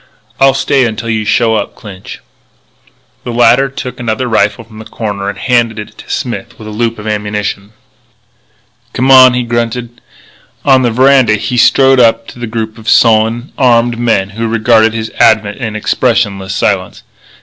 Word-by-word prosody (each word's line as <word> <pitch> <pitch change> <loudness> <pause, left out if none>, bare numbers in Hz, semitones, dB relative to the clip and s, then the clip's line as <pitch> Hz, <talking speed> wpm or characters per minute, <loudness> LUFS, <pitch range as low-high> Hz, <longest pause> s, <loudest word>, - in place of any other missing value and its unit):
"I'll 135 0 +4
stay 135 -2 +1
until 115 +1 -4
you 110 -1 -2
show 115 +1 +1
up, 110 - -3
Clinch." 95 -3 -11 1.0
The 120 - -5
latter 120 +3 +3
took 125 -1 -7
another 120 +1 -2
rifle 110 -1 0
from 110 -1 -15
the 110 - -10
corner 105 -3 -5
and 100 - -7
handed 120 -3 0
it 105 0 -8
to - - -13
Smith 120 -2 -5
with 110 - -11
a - - -7
loop 115 +1 -2
of 105 - -10
ammunition. 105 -1 -4 1.2
"Come 130 +2 +1
on," 130 -1 +7
he 125 - -1
grunted. 120 0 -4 0.6
On 135 -2 +4
the 125 - +1
veranda 130 -1 +3
he 110 +4 -4
strode 135 +2 +4
up 115 -1 +3
to - - -13
the 120 - -5
group 110 0 -5
of 110 - -5
sullen, 115 +2 +2
armed 120 -2 +2
men 105 -5 0
who 115 +3 -4
regarded 110 0 +2
his 110 -1 -4
advent 110 -2 +2
in 110 -4 -5
expressionless 105 -4 -1
silence. - - -2
115 Hz, 170 wpm, -11 LUFS, 110-120 Hz, 1.2 s, on